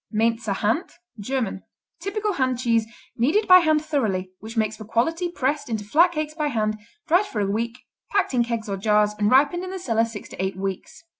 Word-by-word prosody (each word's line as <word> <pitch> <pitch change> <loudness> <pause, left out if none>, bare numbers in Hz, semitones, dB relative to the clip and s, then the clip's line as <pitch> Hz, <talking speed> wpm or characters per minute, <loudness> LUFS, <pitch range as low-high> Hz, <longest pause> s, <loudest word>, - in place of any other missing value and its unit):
Mainzer 225 -1 +1
Hand 225 - -1 0.3
German 225 -3 -2 0.4
Typical 420 +1 -2
hand 260 -5 0
cheese, 230 -3 +1 0.3
kneaded 300 - +2
by 365 0 +9
hand 310 -2 +2
thoroughly, 200 -12 -1
which 225 +2 -9
makes 215 -1 +1
for 215 - -9
quality, 325 - 0
pressed 285 -3 -2
into 220 -2 -2
flat 330 - +4
cakes 305 -2 -3
by 305 -1 -1
hand, 215 -5 -1 0.3
dried 365 +5 +3
for 220 - -4
a 205 - +1
week, 230 +4 -2 0.3
packed 395 -8 +1
in 245 -1 +3
kegs 230 -2 -3
or 200 -1 -2
jars 210 +1 +2
and 205 0 +3
ripened 290 +8 +4
in 370 - -5
the 380 - -5
cellar 230 -10 +1
six 225 -2 -8
to - - -5
eight 190 -1 -2
weeks. 195 - -5
235 Hz, 205 wpm, -24 LUFS, 215-315 Hz, 0.4 s, by